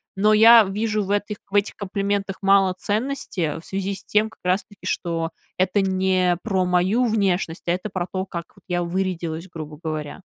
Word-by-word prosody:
Но 210 +2 +3
я 225 +1 +9
вижу 210 +2 -1
в 195 - -7
этох 205 +1 -1 0.2
этих 205 0 +2
комплиментах 200 -1 -2
мало 195 -1 +4
ценности 205 - -2
в 160 - -15
связи 195 0 -3
с - - -11
тем 215 +1 +2
как - - -21
раз 185 +2 +1
таки 205 - -17
что 165 -1 -2 0.3
это 190 +2 +2
не 185 -2 +2
про 190 -4 +1
мою 180 +7 +2
внешность, 195 -6 0
а - - +3
это 185 +4 -2
про 185 -2 -2
то, 190 0 -2
как 170 -2 -5
от 195 - -21
я 175 -1 0
вырядилась, 170 -2 -3
грубо 155 -3 -8
говоря. 155 +1 -4
190 Hz, 185 wpm, -23 LUFS, 175-205 Hz, 0.3 s, я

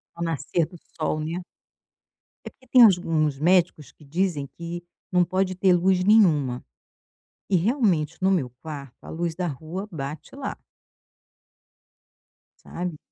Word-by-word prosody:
Ao 170 - -4
nascer 165 +1 0
do 175 - -13 0.2
sol, 155 -1 -1
né. 160 +3 -3 1.1
É - - -5
porque 260 - -26
tem 245 -1 +8
uns 195 -5 +6
uns 155 -5 0
médicos 175 -2 +2
que - - -21
dizem 160 -2 -1
que 170 +3 -7 0.3
não 180 -1 +4
pode 185 +1 0
ter 185 0 +4
luz 180 +1 +3
nenhuma, 160 - +4 0.9
e 190 - +4
realmente 185 - +1
no 190 +1 +3
meu 155 -10 +1
quarto 140 -5 -9
a - - -9
luz 170 0 -2
da 180 +2 -2
rua 160 +8 -6
bate 150 - -7
lá. 275 - -4 2.1
Sabe? 175 -3 -5
170 Hz, 140 wpm, -25 LUFS, 155-185 Hz, 2.1 s, tem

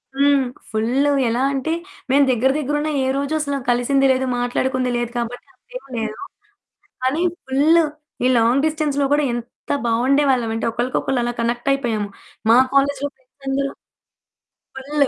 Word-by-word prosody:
హ్మ్. 280 -1 +3 0.3
ఫుల్లు. 245 +7 +1 0.2
ఎలా 235 +2 0
అంటే, 275 +4 -1 0.4
మేము 280 +1 +5
దగ్గర, 255 +2 +2
దగ్గరున్న 295 +1 -1 0.2
ఏ - - 0
రోజు 280 +2 -2
అసలు 285 -2 -1
కలిసింది 245 +3 +2
లేదు, 260 0 +1
మాట్లాడుకుంది 255 +1 0
లేదు 240 -1 -2
కాబట్టి 240 +1 -4
అంతేమి - - -12
లేదు. 220 -1 -3 0.9
కానీ 270 +6 +1 0.2
ఫుల్లు 300 +6 +4 0.4
ఈ - - +4
లాంగ్ 240 +5 +3
డిస్టెన్స్‌లో 300 -3 0
కూడా 295 0 +3
ఎంత 240 0 -9 0.2
బాగుండేవాళ్ళం 255 +1 +2
అంటే, 225 - -2
ఒకళ్ళకొకళ్ళు 250 +2 -1
అలా 240 - -1
కనెక్టైయిపోయాము. 235 -2 0 0.4
మా 235 - +7 0.2
కాలేజిలో 280 0 +2
ఫ్రెండ్స్ 260 +1 -26
అందరు 275 +1 -1 1.0
ఫుల్లు. 280 +1 0
265 Hz, 135 wpm, -20 LUFS, 240-285 Hz, 1.0 s, మా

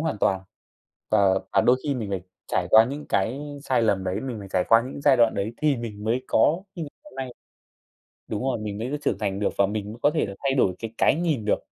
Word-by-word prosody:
hoàn 155 -8 -2
toàn. 95 -1 +2 0.7
Và 100 -3 +4
và - - +5
đôi 125 - +4
khi 145 - 0
mình 110 -6 -4
phải 95 -2 -2 0.2
trải - - 0
qua 110 +1 +8
những 145 +4 -6
cái 115 +8 0 0.2
sai 130 -3 +2
lầm 100 -4 +1
đấy, 95 +3 -2
mình 130 -4 -4
phải 100 - -9
trải 90 - +2
qua 115 0 +6
những 140 - -7
giai 140 -2 +5
đoạn 115 -2 +4
đấy 100 +3 -2
thì 150 -3 +1
mình 110 -3 -6
mới 120 +4 0
có 160 +10 +3
như 175 - -5
ngày 150 - -6
hôm 300 - -15
nay. 130 -1 -4 1.0
Đúng 105 0 -3
rồi, 135 -1 0
mình 105 -1 -5
mới 130 +7 -3
trưởng - - 0
thành 100 -2 -2
được 105 - +2
và 100 - +5
mình 105 0 -3
mới 115 - -11
có - - +5
thể 155 - 0
là 100 - -7
thay 135 -1 +2
đổi 100 -9 +2
cái 115 -1 -6
cái - - +4
nhìn 155 -9 0
được. 105 - +2
115 Hz, 255 wpm, -25 LUFS, 100-135 Hz, 1.0 s, qua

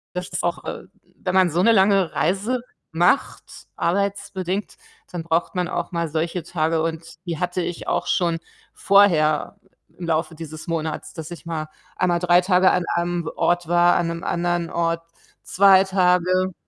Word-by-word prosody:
Das 180 0 -4
ist 180 - -4
auch 175 0 -2
äh, - - -6 0.3
wenn 185 0 -3
man 185 -2 +5
so 170 +2 -1
eine 230 +6 +5
lange 195 -3 +3
Reise 205 +9 0 0.3
macht, 175 +10 0
arbeitsbedingt, 195 +1 -2 0.3
dann 175 -2 -5
braucht 170 +2 -1
man 180 -1 0
auch 175 -1 -4
mal 170 -1 -1
solche 165 +3 -2
Tage 160 -1 -1
und 160 0 -3 0.2
die 170 -3 -3
hatte 180 0 -1
ich 175 -1 -5
auch - - -1
schon 170 -2 +1 0.3
vorher 185 -4 +3 0.4
im 175 - -6
Laufe 160 0 -1
dieses 155 -1 -9
Monats, 160 -2 -4
dass 160 -1 -8
ich 170 - -9
mal 155 -2 -4 0.3
einmal 175 -2 +1
3 175 0 +4
Tage 185 0 +4
an 180 - +1
einem 170 -1 -1
w - - -3
Ort 175 -1 +1
war, 175 +1 +4
an 175 - +1
'nem 170 0 -5
anderen 175 -1 -1
Ort 165 0 -1 0.4
2 195 0 +5
Tage. 185 -1 +2
175 Hz, 170 wpm, -22 LUFS, 165-185 Hz, 0.4 s, man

